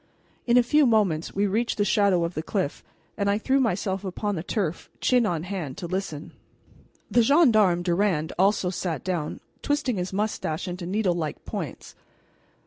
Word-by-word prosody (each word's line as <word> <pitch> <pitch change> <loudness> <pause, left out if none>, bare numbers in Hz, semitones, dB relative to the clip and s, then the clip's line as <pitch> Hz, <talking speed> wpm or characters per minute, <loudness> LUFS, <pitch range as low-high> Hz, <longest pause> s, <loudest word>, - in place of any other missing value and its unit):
In 240 +1 +5
a 245 - +6
few 295 +3 +4
moments 195 -9 +1
we 200 +1 +2
reached 220 +4 0
the 205 - +2
shadow 200 -3 +3
of 170 +1 -2
the 155 - -3
cliff, 175 -3 -3 0.3
and 200 -2 +1
I 200 - +2
threw 265 +5 +1
myself 195 -4 0
upon 205 +2 -3
the 160 - -3
turf, 180 -3 -3
chin 245 -3 +3
on 165 -4 -2
hand, 180 -7 -5
to 195 - -5
listen. 170 -4 -4 0.8
The 240 - +5
gendarme, 220 - +4
Durand, 175 -3 0
also 195 -1 +3
sat 170 -6 -3
down, 175 -5 -3 0.2
twisting 290 -6 0
his 180 +1 -3
mustache 195 -6 -2
into 175 -1 -5
needlelike 180 -6 -1
points. - - -6
195 Hz, 165 wpm, -25 LUFS, 175-215 Hz, 0.8 s, a